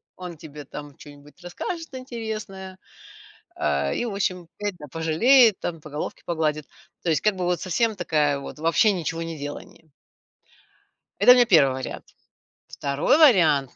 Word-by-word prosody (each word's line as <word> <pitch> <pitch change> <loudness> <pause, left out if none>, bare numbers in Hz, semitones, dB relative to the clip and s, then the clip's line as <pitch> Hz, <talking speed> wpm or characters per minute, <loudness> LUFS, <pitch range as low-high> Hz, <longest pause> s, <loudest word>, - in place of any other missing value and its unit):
он 180 -2 -8
тебе 150 -2 -11
там 145 0 -10
чё-нибудь 145 +2 -15
расскажет 325 - -6
интересное, 215 -7 -7 0.8
а, 70 -1 0
и, - - -2
в 220 - -4
общем, 180 -3 -2
опять, 205 -2 -3
да, 150 - -8
пожалеет 210 - +4
там, 165 -3 -5
по 155 - -11
головке 150 +1 -6
погладит, 155 -3 -1 0.4
то 170 - -1
есть 155 - +2
как 210 -2 +2
бы 180 - -4
вот 175 0 0
совсем 220 +4 0
такая 150 -5 +1
вот 140 - -9
вообще 170 +7 +3
ничегонеделание. 165 -2 -6 1.3
Это 250 - +8
у - - +9
меня 245 -1 +5
1 145 -10 +5
вариант. 130 - -6 0.6
2 140 - 0
вариант: 165 - +4
170 Hz, 150 wpm, -24 LUFS, 150-205 Hz, 1.3 s, у